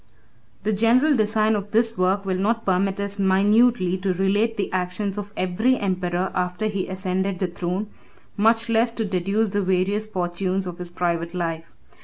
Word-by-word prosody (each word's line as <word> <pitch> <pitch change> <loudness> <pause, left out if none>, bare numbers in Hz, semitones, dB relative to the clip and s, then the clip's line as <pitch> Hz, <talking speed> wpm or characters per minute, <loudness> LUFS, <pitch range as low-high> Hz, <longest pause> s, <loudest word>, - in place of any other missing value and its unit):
] 115 - -35
The 215 +2 0
general 245 +8 +3
design 215 -1 +2
of 205 0 -4
this 225 +1 +2
work 190 +1 +1
will 185 -1 -1
not 225 +3 0
permit 190 +1 +1
us 200 0 -2
minutely 195 0 +3
to 190 0 0
relate 205 +5 +1
the 200 - -2
actions 185 +2 -2
of 205 -1 -6
every 215 +8 +1
emperor 185 -1 -1
after 180 +3 -2
he 200 -3 -2
ascended 190 0 -2
the 185 - -1
throne, 180 +3 -3 0.5
much 225 +2 +3
less 230 +1 +2
to 225 -1 -2
deduce 200 +3 0
the 205 +1 0
various 190 +3 0
fortunes 185 -1 -2
of 180 0 -7
his 180 -1 -4
private 170 0 -2
life. 165 -2 -4
195 Hz, 175 wpm, -23 LUFS, 180-215 Hz, 0.5 s, general